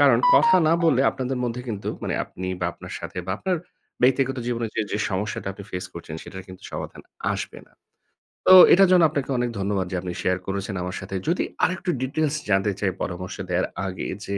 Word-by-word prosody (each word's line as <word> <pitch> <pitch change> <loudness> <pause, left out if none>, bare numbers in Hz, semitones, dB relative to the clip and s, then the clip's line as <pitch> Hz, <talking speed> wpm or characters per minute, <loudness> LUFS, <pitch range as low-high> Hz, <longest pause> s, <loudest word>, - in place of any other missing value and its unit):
কারণ - - +6 0.2
কথা 185 0 +6
না - - +5
বললে, 155 -6 +4
আপনাদের 130 0 -3
মধ্যে 120 0 -3
কিন্তু, 105 -3 -4
মানে - - -2
আপনি 95 - -7
বা, 90 - +1
আপনার - - -10
সাথে - - -7
বা 95 - -1
আপনার 185 -1 0 0.5
ব্যক্তিগত 135 +1 +3
জীবনে 120 -1 -1
যে, - - +2
যে 105 - 0
সমস্যাটা 100 +1 -2
আপনি 100 +1 -10
face 90 +1 -5
করছেন, 85 -2 -7
সেটার 95 -1 -9
কিন্তু 95 0 -12
সমাধান - - -6 0.3
আসবে - - -5
না। - - -27 0.8
তো - - +9 0.2
এটার 195 +1 +6
জন্য 180 -2 +6
আপনাকে 140 -2 -3
অনেক 120 0 0
ধন্যবাদ 100 -1 0
যে, - - -2
আপনি 90 -1 -4
শেয়ার 90 0 +1
করেছেন 100 +1 -3
আমার 90 +1 -4
সাথে। 95 0 -6
যদি 170 +3 +2 0.2
আরেকটু 185 0 0
details 145 +3 0
জানতে 95 +1 +3
চাই 100 -2 +1
পরামর্শ 90 +1 -4
দেয়ার 90 +1 +1 0.2
আগে 90 -1 -4 0.2
যে, 100 - -2
105 Hz, 200 wpm, -24 LUFS, 95-135 Hz, 0.8 s, তো